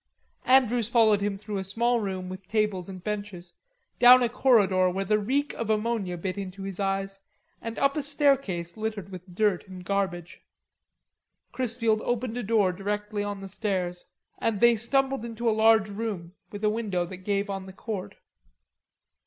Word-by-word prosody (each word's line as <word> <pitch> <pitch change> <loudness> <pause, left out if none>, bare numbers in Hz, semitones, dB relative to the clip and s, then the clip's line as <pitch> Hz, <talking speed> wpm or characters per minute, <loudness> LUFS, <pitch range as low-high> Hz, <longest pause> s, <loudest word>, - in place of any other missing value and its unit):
Andrews 245 -3 +4
followed 220 -4 +4
him 200 -1 -1
through 205 0 -5
a - - -3
small 235 +5 +1
room 190 -3 -4
with 185 0 -9
tables 210 -4 -1
and 185 -2 -9
benches, 200 -4 -5 0.5
down 250 +1 +8
a 240 - +1
corridor 200 -7 +3
where 190 +2 -2
the 210 +1 +2
reek 275 +7 -1
of 230 - -4
ammonia 215 -4 -1
bit 185 +3 -4
into 195 0 -6
his 195 -1 -6
eyes, 195 0 -2 0.4
and 230 0 -6
up 275 0 +2
a 300 - 0
staircase 275 - +1
littered 215 -3 -4
with 180 -1 -10
dirt 205 -2 +1
and 185 -1 -10
garbage. 190 -3 -2 1.1
Chrisfield 230 -3 +1
opened 240 -1 -2
a 245 - -2
door 210 -4 +2
directly 205 +2 -3
on 205 -1 -4
the 195 - -7
stairs, 185 -3 -3 0.3
and 220 -3 0
they 235 +1 +6
stumbled 270 +2 +1
into 235 0 -4
a - - +5
large 220 -1 +4
room 200 -5 -5 0.2
with 205 0 -8
a 210 - +4
window 205 -6 -1
that 180 +1 -8
gave 200 +2 -1
on 195 -1 -5
the - - -8
court. 200 -2 -6
205 Hz, 170 wpm, -27 LUFS, 190-230 Hz, 1.1 s, down